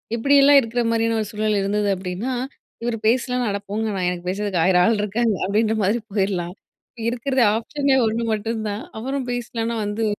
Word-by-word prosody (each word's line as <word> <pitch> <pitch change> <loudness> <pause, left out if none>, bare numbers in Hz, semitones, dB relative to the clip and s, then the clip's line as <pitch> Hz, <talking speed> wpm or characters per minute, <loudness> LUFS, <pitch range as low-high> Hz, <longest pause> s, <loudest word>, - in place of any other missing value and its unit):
இப்டியெல்லாம் 280 +3 +6
இருக்ற 240 0 -2
மாரியான 230 0 +1
ஒரு 210 - -4
சூழல் 215 -1 0
இருந்தது 205 +1 0
அப்டின்னா, 185 +7 -4 0.5
இவர் 235 -1 -1
பேசலனா? 250 +1 +1
அட 200 - -1
போங்க 220 +2 -1
நான் 180 -1 0
எனக்கு 180 0 -5
பேசுறதுக்கு 195 -2 -1
1000 180 -1 +4
ஆள் 225 - +3
இருக்காங்க. 220 +2 0
அப்டின்ற 215 +3 +1
மாரி 210 +5 +1
போயிறலாம். 190 -3 -1 0.5
இருக்குறது 250 +1 0
ஆப்ஷனே 275 +4 0
ஒண்ணு 230 +2 -1
மட்டுந்தான், 215 -1 -3 0.2
அவரும் 265 +1 -3
பேசலனா 235 -1 -3
வந்து 210 +2 -2
225 Hz, 160 wpm, -22 LUFS, 205-240 Hz, 0.5 s, இப்டியெல்லாம்